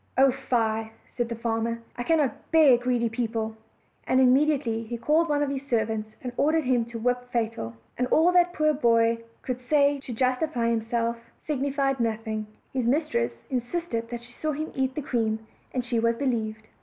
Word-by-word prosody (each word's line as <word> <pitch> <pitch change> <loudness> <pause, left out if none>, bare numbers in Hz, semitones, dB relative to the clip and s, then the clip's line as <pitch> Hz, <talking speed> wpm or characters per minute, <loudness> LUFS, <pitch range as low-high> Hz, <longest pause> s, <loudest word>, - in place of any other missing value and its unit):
"Oh, 270 0 +6
fie," 225 -4 -1
said 240 -1 -3
the 230 - -3
farmer, 230 0 -1 0.2
"I - - -5
cannot 300 0 0
bear 310 -6 +7
greedy 245 -1 +1
peo 230 +1 -1
ple;" 220 -1 -3 0.5
and 260 - +3
immediately 260 -3 +3
he 235 +1 -5
called 310 +7 +2
one 290 0 +2
of 280 - -1
his 275 0 -5
servants, 220 -3 -1
and 250 -1 -4
ordered 315 +2 +3
him 250 -3 +2
to 235 0 -7
whip 245 +2 0
Fatal: 225 - -2 0.2
and 250 - +2
all 325 +6 +4
that 355 -1 +4
the - - -15
poor 305 0 +3
boy 230 -4 +3 0.2
\could 255 -1 -3
say 285 +2 +3
to 265 - -8
justify 255 +1 0
himself 230 +1 0 0.3
signified 275 -2 0
nothing; 220 -2 -2 0.3
his 255 -3 0
mis 300 +5 +2
tress 115 0 -2
insisted 245 -2 -2
that 240 0 -6
she 240 - -14
saw 310 +4 -2
him 310 +2 -4
eat 265 -1 -1
the 300 - -3
cream 220 -3 -1 0.3
and 250 -2 -2
she 240 -2 0
was 230 0 +2
believed. 220 -5 -2
245 Hz, 190 wpm, -26 LUFS, 230-275 Hz, 0.5 s, bear